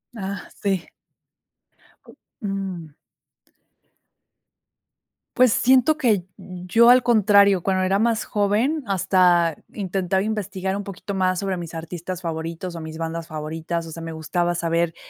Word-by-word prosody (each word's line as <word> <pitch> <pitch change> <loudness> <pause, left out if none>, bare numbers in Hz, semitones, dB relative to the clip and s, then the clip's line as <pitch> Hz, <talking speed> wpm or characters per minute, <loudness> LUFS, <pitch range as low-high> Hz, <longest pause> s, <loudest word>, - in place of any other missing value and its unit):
Ah, 200 -2 -5
sí. 195 -4 0 1.6
Mm. 195 - -4 2.5
Pues, 255 -4 +5
siento 260 +4 +4
que 215 - +1
yo, 185 +6 +2
al 250 0 +7
contrario, 200 -4 +5
cuando 185 +1 0
era 190 +1 +1
más 225 0 +1
joven, 220 +9 0
hasta 180 -3 +3 0.2
intentaba 190 -1 -1
investigar 200 -3 -3
un 205 - -4
poquito 200 +1 -7
más 185 -1 +1
sobre 195 -2 -2
mis 170 -1 -7
artistas 175 +2 -6
favoritos 165 +2 -4
o 165 - -6
mis 160 0 -7
bandas 165 0 -4
favoritas. 160 +2 -4
O 165 - -9
sea, 165 - -8
me 165 0 -6
gustaba 175 +2 -1
saber, 170 0 0
185 Hz, 125 wpm, -23 LUFS, 170-205 Hz, 2.5 s, al